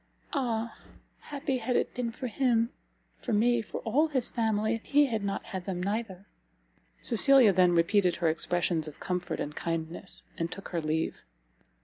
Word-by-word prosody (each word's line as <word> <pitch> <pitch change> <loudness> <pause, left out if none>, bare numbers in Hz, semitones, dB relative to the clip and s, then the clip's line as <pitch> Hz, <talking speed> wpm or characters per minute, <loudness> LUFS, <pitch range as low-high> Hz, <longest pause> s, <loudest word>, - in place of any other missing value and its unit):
Ah! 235 -5 -2 0.4
happy 275 -2 -3
had 245 +2 -1
it - - 0
been 245 -2 -2
for 255 +3 -7
him, 235 -1 +1 0.5
for 240 - -2
me, 235 +3 +3
for 215 - -6
all 280 +8 +2
his 260 -5 -1
family, 220 -1 +1
if 225 - -4
he 290 +1 +4
had 225 -6 -2
not 200 0 -2
had 190 -5 -6
them 185 -2 -2
neither!" 200 -2 -3 0.8
Cecilia 245 -2 +6
then 180 -1 +4
repeated 180 +1 +3
her 170 - 0
expressions 165 0 0
of 150 - -10
comfort 180 -1 -3
and 150 +1 -4
kindness, 165 +3 -2 0.2
and 165 +1 -2
took 195 - -7
her 170 -2 -2
leave. 155 +1 -2
215 Hz, 165 wpm, -29 LUFS, 175-240 Hz, 0.8 s, Cecilia